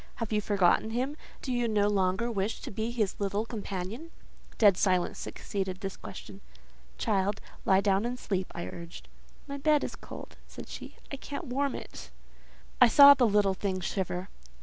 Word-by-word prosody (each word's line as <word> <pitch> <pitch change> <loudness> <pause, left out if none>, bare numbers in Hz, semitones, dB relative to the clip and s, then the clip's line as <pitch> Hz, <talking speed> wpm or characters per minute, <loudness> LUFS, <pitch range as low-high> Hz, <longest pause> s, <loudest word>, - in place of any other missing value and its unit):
Have 230 -2 -4
you 210 - +2
forgotten 200 +1 +3
him? 255 +6 -2 0.3
Do 260 - -2
you 245 -1 +1
no 210 -2 +2
longer 200 +3 +1
wish 200 0 -2
to - - -6
be 220 +3 -2
his 225 -5 -1
little 200 +2 -1
companion?" 215 - -5 0.5
Dead 205 -4 +6
silence 185 -2 +1
succeeded 190 -2 -4
this 195 -1 -4
question. - - -10 0.6
"Child, 200 -2 0 0.3
lie 190 0 +5
down 195 0 +2
and 245 +1 -2
sleep," 190 -6 -3
I 170 - -4
urged. 170 0 -9 0.4
"My 280 0 -5
bed 300 +1 +3
is - - -4
cold," - - -10
said - - -10
she. - - -8 0.2
"I 275 - -4
can't 285 +4 -6
warm 275 +1 -1
it." - - -9 0.7
I 250 - +10
saw 280 +4 +10
the 255 -4 +3
little 205 -2 +3
thing 190 -1 -2
shiver. 185 0 -3
210 Hz, 170 wpm, -29 LUFS, 190-245 Hz, 0.7 s, I